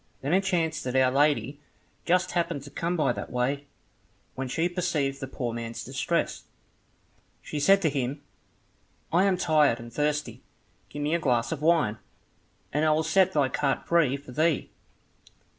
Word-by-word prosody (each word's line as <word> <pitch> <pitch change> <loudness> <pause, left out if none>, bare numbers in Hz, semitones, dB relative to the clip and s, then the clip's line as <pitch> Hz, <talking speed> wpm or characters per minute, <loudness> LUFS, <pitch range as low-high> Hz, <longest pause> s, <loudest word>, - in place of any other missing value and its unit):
Then 140 +5 -1
it 190 +1 +3
chanced 170 -4 0
that 125 0 -3
Our 130 -1 +4
Lady 140 -1 +1 0.5
just 180 +1 +2
happened 170 -5 -1
to 145 - -11
come 175 +1 -2
by 150 -3 +2
that - - -6
way, 125 +2 +1
and 140 - -16 0.7
when 135 0 -4
she 160 +7 0
perceived 170 -6 -1
the 135 - -5
poor 125 -3 -4
man's 115 -1 -5
distress, 135 +6 -2 1.0
she 150 - -4
said 195 +6 +4
to 160 - +3
him, 140 +1 -3 0.9
"I 180 +3 +4
am 190 -2 +2
tired 155 -8 +3
and 115 0 -10
thirsty, 150 +1 -1 0.5
give 145 - -5
me 150 +2 0
a 170 - +2
glass 125 -5 +1
of 155 -3 -3
wine, 155 -10 +2 0.7
and 150 +2 +1
I 155 - +4
will 155 +1 +1
set 190 +4 +3
thy 145 -3 +3
cart 140 0 -1
free 150 -6 +3
for 140 -2 -13
thee." 155 +3 0
150 Hz, 175 wpm, -27 LUFS, 135-170 Hz, 1.0 s, Our